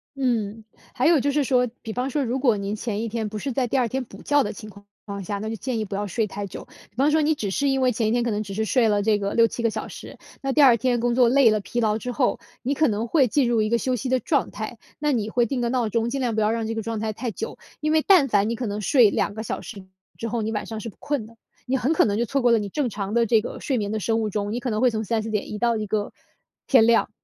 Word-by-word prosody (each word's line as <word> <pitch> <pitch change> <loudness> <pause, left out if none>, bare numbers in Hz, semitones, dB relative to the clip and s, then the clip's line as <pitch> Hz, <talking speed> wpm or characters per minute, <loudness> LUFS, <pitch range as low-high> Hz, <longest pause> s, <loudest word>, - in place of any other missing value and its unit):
嗯， 225 -5 -1 0.3
还 265 +3 +1
有 330 -4 +5
就 285 +2 +1
是 290 0 +1
说， 250 -1 +2
比 220 - -6
方 250 +3 -2
说 290 -2 0
如 250 +2 -1
果 250 -5 +3
您 200 +1 -3
前 215 -1 -3
一 230 - -3
天 220 -1 -3
不 215 0 -5
是 275 +3 -3
在 255 +1 0
第 270 - 0
2 245 -2 +2
天 260 +2 -2
补 - - -13
觉 290 -1 +3
的 205 - -4
情 215 +1 -10
况 200 0 -15
情 200 - -60
况 200 -1 -5
下， 200 +2 -3
那 220 +1 -4
就 225 - -3
建 245 -1 -3
议 - - -1
不 195 - -5
要 205 +1 -2
睡 215 +4 -1
太 200 +1 -5
久。 - - -9 0.2
比 - - -38
方 275 +4 +3
说 315 - +3
你 310 +1 +3
只 205 -7 -3
是 280 +8 0
因 270 -1 +1
为 255 -1 +3
前 220 -1 0
一 - - +1
天 240 0 +1
可 240 - -1
能 210 +1 -1
只 195 -1 -7
是 220 +2 -1
睡 235 0 +2
了 205 -1 +2
这 210 0 +2
个 200 0 -2
6、7 230 +1 +2
个 230 - +3
小 - - -5
时， - - -10 0.2
那 270 -1 -1
第 300 - +4
2 250 -4 +7
天 245 0 +1
工 240 0 +1
作 250 -2 +5
累 265 -3 +5
了 215 0 +2
疲 240 +4 -3
劳 215 -1 +2
之 245 +2 -5
后， 255 -1 +1 0.2
你 270 +3 -1
可 310 0 +3
能 220 +1 -1
会 270 -1 +3
进 255 +1 +2
入 230 -2 +2
一 215 - -1
个 235 - +3
休 255 -1 0
息 260 - -4
的 255 0 +2
状 285 -5 0
态， 220 +2 -6 0.2
那 295 0 +1
你 220 -4 -1
会 240 -1 +2
定 260 0 -2
个 235 - 0
闹 245 -3 0
钟， 230 +2 0
尽 275 +1 -2
量 235 -3 0
不 220 - +1
要 210 +1 +2
让 230 -1 -2
这 225 - -2
个 225 - -2
状 225 0 -3
态 220 - -1
太 230 +2 -4
久。 - - -6 0.2
因 305 0 0
为 315 0 +4
但 360 -8 +6
凡 205 0 +2
你 - - -1
可 240 +1 -4
能 205 +1 -3
睡 235 0 +5
2 - - -1
个 220 - -5
小 - - -3
时 200 -4 -9 0.4
之 230 - -3
后， 235 0 -1
你 220 - -2
晚 210 - -3
上 220 -1 -5
是 230 - -6
不 - - -16
困 285 -7 -2
的， 230 +1 -16 0.3
你 265 +1 0
很 265 +4 +1
可 325 - +4
能 205 -1 0
就 - - +2
错 275 +3 -1
过 240 - +5
了 230 - +4
你 205 -1 -4
正 280 +4 -1
常 205 -1 -4
的 235 0 +4
这 225 -1 +3
个 - - -7
睡 265 - -1
眠 205 -2 -2
的 220 - -1
生 225 +2 0
物 215 - -1
钟。 205 +1 -2
你 240 - -2
可 250 - -2
能 215 -1 -1
会 255 - +4
从 220 0 -2
3、4 220 +1 -2
点 210 -1 -2
移 210 - -4
到 235 +1 +1
一 215 -1 -2
个 210 0 -2 0.5
天 235 -4 +5
亮， 230 -3 +3
230 Hz, 335 characters per minute, -24 LUFS, 215-255 Hz, 0.5 s, 2